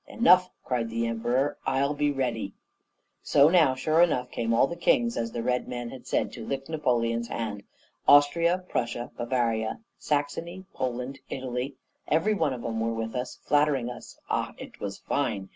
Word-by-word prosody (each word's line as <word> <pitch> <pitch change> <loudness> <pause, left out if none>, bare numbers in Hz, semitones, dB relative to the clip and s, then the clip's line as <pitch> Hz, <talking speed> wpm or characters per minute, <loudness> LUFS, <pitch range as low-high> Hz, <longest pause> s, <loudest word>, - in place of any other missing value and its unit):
'Enough,' 185 -6 +5
cried 120 -3 -1
the 115 +1 -1
Emperor, 120 +5 0
'I'll 135 +2 +1
be 145 0 +1
ready.' 120 -7 -2 0.7
"So 145 +1 +5
now, 160 -7 +5
sure 155 +5 +2
enough, 125 -8 +2
came 115 -1 -1
all 115 +3 +5
the 170 - -5
kings, 235 +7 +2
as 115 0 -2
the 115 - -3
Red 125 +1 0
Man 120 -1 -5
had 130 - -11
said, - - 0
to - - -7
lick 135 0 -4
Napoleon's 120 -7 0
hand! 105 -4 -4 0.5
Austria, 170 +5 +5
Prussia, 120 -3 -2
Bavaria, 120 -2 -1 0.2
Saxony, 165 +5 -2
Poland, 125 +1 -3
Italy, 130 0 -4 0.3
every 175 +8 +2
one 160 -8 +1
of 125 -2 -5
them 115 -1 -2
were 115 0 -1
with 115 0 -3
us, 125 0 -4
flattering 145 -4 +2
us; - - -11
ah, - - -1
it - - -11
was 100 -1 -4
fine! 105 -9 -2
130 Hz, 170 wpm, -27 LUFS, 115-150 Hz, 0.7 s, Enough